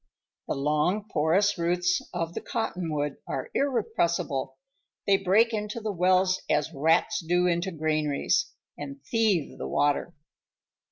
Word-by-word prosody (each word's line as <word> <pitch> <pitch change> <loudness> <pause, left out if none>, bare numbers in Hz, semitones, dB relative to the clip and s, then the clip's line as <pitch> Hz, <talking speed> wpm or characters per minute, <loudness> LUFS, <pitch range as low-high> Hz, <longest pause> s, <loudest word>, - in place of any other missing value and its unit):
The - - -1
long 150 +9 0
porous 185 +6 +2
roots 180 +1 +1
of 170 -1 -3
the - - -4
cottonwood 160 - -2
are - - -4
irrepressible. 170 - -1 0.5
They 195 -1 +4
break 205 +5 +3
into 210 +1 -3
the 220 -1 -3
wells 185 0 +2
as 155 +2 +1
rats 160 +3 +2
do 175 +1 +1
into 175 +1 +1
granaries, 155 -3 0 0.2
and 140 -1 -7
thieve 210 -8 0
the 65 - -4
water. 145 - 0
175 Hz, 125 wpm, -27 LUFS, 150-195 Hz, 0.5 s, They